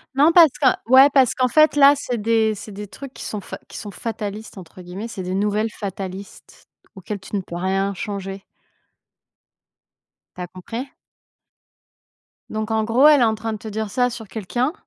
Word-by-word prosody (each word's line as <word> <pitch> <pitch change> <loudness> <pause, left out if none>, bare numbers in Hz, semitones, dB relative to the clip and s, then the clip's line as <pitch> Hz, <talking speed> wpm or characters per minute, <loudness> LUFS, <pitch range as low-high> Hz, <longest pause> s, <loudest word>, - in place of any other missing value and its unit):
Non, 295 +4 +5
parce 335 -3 +8
que 280 - 0 0.3
ouais, 265 +2 +8
parce 265 -4 +4
qu'en 255 -1 +2
fait, 310 +4 +4
là, 280 0 +7
c'est 245 -4 -4
des 220 0 +1
c'est 210 +1 -10
des 205 +1 -8
trucs 275 +5 -10
qui - - -9
sont 210 - -5
f - - -13
qui - - -10
sont 205 - -7
«fatalistes», 215 -1 -6
entre 180 0 -12
guillemets, 185 +6 -7
c'est 200 -4 -7
des 185 +1 -3
nouvelles 210 +2 0
fatalistes 195 0 -8 0.3
auxquelles 200 +2 -6
tu 190 +2 -8
ne 200 - 0
peux 170 - -9
rien 195 +2 -1
changer. 195 0 -6 1.9
Tu - - -7
as 180 - -4
compris? 230 +9 -7 1.6
Donc 215 0 -4
en 220 0 +1
gros, 240 +7 +4
elle 295 -4 +6
est - - +6
en 220 -1 +2
train 220 +1 -4
de 215 - -4
te 220 - -9
dire 220 0 -4
ça 250 +3 +1
sur 225 -2 -8
quelqu'un 235 - -2
215 Hz, 190 wpm, -21 LUFS, 195-245 Hz, 1.9 s, parce